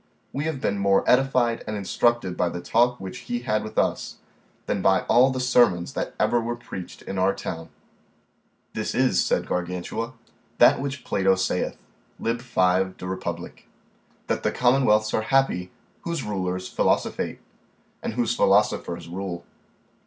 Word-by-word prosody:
We 145 +3 -2
have 160 -4 -2
been 100 -5 -1
more 100 0 +3
edified 125 -3 +3
and 105 0 -3
instructed 100 -1 +1
by 90 - +1
the 90 - -5
talk 120 +6 +2
which 95 +6 -7
he 120 0 -1
had 110 -3 0
with 110 - -8
us, - - 0 0.5
than 100 - -1
by 95 0 +4
all 125 +3 +4
the 130 -1 -2
sermons 120 -9 +3
that - - -4
ever 120 - +2
were 120 +1 -2
preached 95 -6 -9
in 95 - -4
our 95 +1 +2
town. 80 -1 -6 1.0
This - - -3
is, - - +3
said - - 0
Gargantua, 90 +7 -3 0.4
that 120 - +6
which 140 -1 -4
Plato 95 0 +2
saith, 95 -1 -1 0.4
Lib. 115 +1 -1
5 95 -5 +1
de - - -8
Republ., 90 -2 -5 0.7
that - - -1
those - - 0
commonwealths 120 -4 +3
are - - +2
happy, 110 -7 +1 0.3
whose 170 -4 -3
rulers 95 -2 -3
philosophate, - - 0 0.6
and - - -3
whose 120 0 0
philosophers 95 -5 +2
rule. 90 0 -5
105 Hz, 155 wpm, -25 LUFS, 95-120 Hz, 1.0 s, that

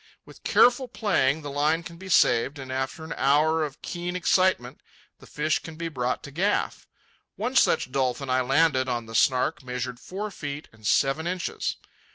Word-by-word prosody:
With - - -16
careful 250 +2 +4
playing 160 - +1
the 145 - -5
line 150 +4 +1
can 170 0 -10
be 190 +2 -10
saved, 130 -3 +3
and 135 -1 -7
after 130 +4 -3
an 160 +1 -5
hour 155 +4 +3
of 145 -3 -6
keen 175 0 -4
excitement 180 -8 +1 0.4
the - - -15
fish 155 +1 0
can 160 - -10
be 165 +1 -4
brought 125 -4 -2
to 145 - -9
gaff. 190 +8 -1 0.5
One 255 +2 -3
such 130 - +3
dolphin 130 +1 -1
I 130 0 +2
landed 135 0 +2
on 120 -2 -2
the 115 - -11
Snark 130 +7 +2
measured 125 -1 -5
four 205 +7 -6
feet 145 -4 -6
and 110 -1 -9
seven 140 +5 +2
inches. 180 0 -2
145 Hz, 180 wpm, -26 LUFS, 130-170 Hz, 0.5 s, careful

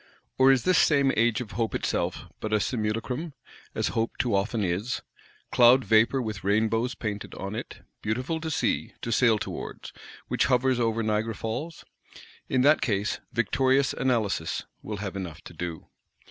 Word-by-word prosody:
Or 130 +1 +7
is 130 -2 +3
this 185 -1 +4
same 140 -3 +4
Age 115 +1 +2
of 110 -3 -7
Hope 115 -1 -1
itself - - -1
but 110 - -4
a 105 - +4
simulacrum; 120 - -2 0.4
as - - 0
Hope 115 0 -2
too 120 -4 0
often 105 +3 0
is? 95 +7 -2 0.5
Cloud 125 +2 +6
vapour 115 +4 +4
with 110 -3 -5
rainbows 110 +5 +1
painted 105 -2 -5
on 100 +1 -5
it, 110 - -7 0.2
beautiful 130 +9 -2
to 160 - -3
see, 155 - -1
to 115 - -2
sail 115 -1 +4
towards,—which - - -5
hovers 130 -1 +2
over 115 -1 +1
Niagara 110 +1 0
Falls? 145 +11 -5 0.6
In 130 - +2
that 150 +2 +5
case, 105 -3 0
victorious 130 +3 +2
Analysis 110 -10 0 0.2
will 105 -1 -5
have 100 -1 -5
enough 85 -4 -6
to - - -11
do. 85 -1 -5
115 Hz, 160 wpm, -27 LUFS, 105-130 Hz, 0.6 s, Or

